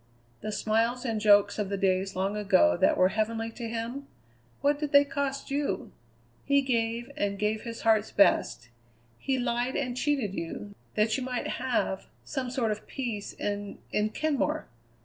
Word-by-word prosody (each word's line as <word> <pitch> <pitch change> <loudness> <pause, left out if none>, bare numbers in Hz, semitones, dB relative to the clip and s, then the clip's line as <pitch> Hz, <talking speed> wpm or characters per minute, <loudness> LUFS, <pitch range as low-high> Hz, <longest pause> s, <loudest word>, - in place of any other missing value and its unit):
The 215 - -3
smiles 230 +4 0
and 225 -3 -1
jokes 205 0 +5
of 205 -2 -1
the 200 - -1
days 190 0 +1
long 195 +2 0
ago 85 - +4
that - - +3
were 185 0 +5
heavenly 225 +2 -1
to 230 0 -6
him 235 +5 -4 0.5
what 285 +1 +2
did 295 -1 -3
they 285 0 +8
cost 275 -1 -3
you? 280 -9 -1 0.5
He 280 0 +3
gave, 235 0 -1
and 200 0 -1
gave 210 +1 0
his 230 -1 -7
heart's 220 -1 +3
best; 120 - +3 0.5
he 265 -1 0
lied 245 +1 -1
and 250 -3 -1
cheated 260 -7 0
you, 200 +4 -5 0.2
that 215 +1 +2
you 260 - -3
might 250 -1 -3
have 245 -6 -1 0.2
some 265 -3 -3
sort 240 -3 0
of 210 - -5
peace 235 -7 -4
in 205 0 -4
in 210 +1 +1
Kenmore. 300 +4 -1
225 Hz, 170 wpm, -28 LUFS, 205-260 Hz, 0.5 s, they